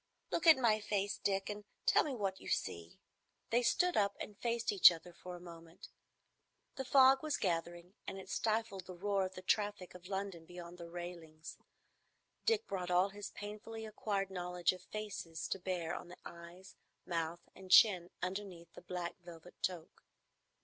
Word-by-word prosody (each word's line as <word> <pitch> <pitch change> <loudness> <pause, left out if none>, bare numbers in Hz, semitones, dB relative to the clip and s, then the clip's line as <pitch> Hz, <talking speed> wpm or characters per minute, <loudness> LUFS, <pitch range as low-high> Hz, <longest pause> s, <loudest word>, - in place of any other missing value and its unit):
Look 335 - 0
at 320 - +10
my 230 -4 +3
face, 205 -1 -1
Dick, 195 0 0
and 210 0 -5 0.2
tell - - +5
me 285 -4 -3
what 195 -4 -2
you - - -10
see." 85 0 -2 0.5
They 240 +2 +4
stood 355 +9 +3
up 200 -1 +2
and 210 - -6
faced 235 +1 0
each 195 -3 +9
other 175 +1 -8
for 180 +1 -8
a - - -9
moment. 170 -1 -12 0.9
The 265 - -3
fog 265 0 +7
was 310 -2 -1
gathering, 175 0 -2
and - - -4
it 190 - -9
stifled 220 -4 -1
the 185 - -7
roar 195 +1 +1
of 185 - -14
the 185 - -8
traffic 205 -2 0
of 180 0 -11
London 190 -4 -4
beyond 175 0 -9
the 170 0 -8
railings. 170 -2 -8 0.9
Dick 450 -1 +3
brought 180 -2 -3
all 180 +2 +4
his 205 0 -7
painfully 220 +2 -7
acquired 200 -2 -2
knowledge 180 -1 0
of 185 - -10
faces 185 -5 -5
to 195 - -1
bear 175 -3 -2
on - - -6
the 180 - -11
eyes, 170 +2 -11 0.3
mouth, 170 0 -3
and 190 0 -12
chin 185 -3 +7
underneath 180 -3 -5
the - - -11
black 180 +1 -5
velvet 175 0 -11
toque. 175 -3 -3
185 Hz, 175 wpm, -36 LUFS, 175-210 Hz, 0.9 s, at